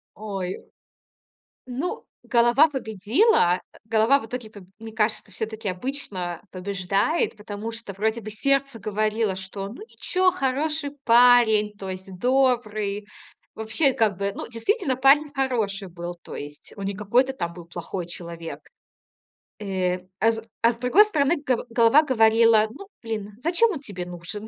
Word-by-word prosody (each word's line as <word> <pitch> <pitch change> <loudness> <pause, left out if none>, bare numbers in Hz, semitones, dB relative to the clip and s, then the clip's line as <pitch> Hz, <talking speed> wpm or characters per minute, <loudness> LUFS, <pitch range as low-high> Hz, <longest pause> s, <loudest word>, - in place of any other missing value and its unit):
Ой, 195 -3 -4 1.1
ну, 260 +8 -4 0.2
голова 240 +5 +4
победила. 220 - +2
Э, - - -16
голова 225 +5 +3
в 225 - -9
итоге 235 -1 -6
по 205 -2 -13 0.2
мне 225 0 -8
кажется, 215 -1 -1
всё-таки 220 -1 -5
обычно 185 - -4
побеждает, 195 - 0
потому 210 +2 -6
что 220 -3 -7
вроде 220 +4 -1
бы 215 - -7
сердце 275 +1 0
говорило, 215 -1 0
что, 190 +1 -6
ну, 245 - -11
ничего, 370 -4 0
хороший 285 +2 -1
парень, 230 -3 +5
то 190 -1 -6
есть 185 0 -7
добрый. 215 -5 +1 0.5
Вообще, 255 +6 +1
как 210 -5 +1
бы, 200 0 -2
ну, - - -5
действительно, 265 - 0
парень 285 +2 +5
хороший 220 -8 -1
был. 175 0 -6
То - - -9
есть 145 +1 -9
он 200 -1 -6
не 200 - -2
какой-то 240 +7 +1
там 170 -8 -4
был 170 -1 -11
плохой 175 +1 -5
человек. 170 -1 -7 1.0
Э, 185 -3 -1 0.2
а 225 +3 +4
с 225 0 -5 0.2
а 230 +1 +5
с 230 - -9
другой 255 - +5
стороны, 305 -4 +1
го 250 -2 0
голова 235 +6 +5
говорила: 225 -4 +4
"Ну, 390 - -11
блин, 215 -3 -4
зачем 360 +7 +3
он 315 - -4
тебе 195 -9 -6
нужен?" 180 +5 -7
220 Hz, 150 wpm, -24 LUFS, 195-260 Hz, 1.1 s, парень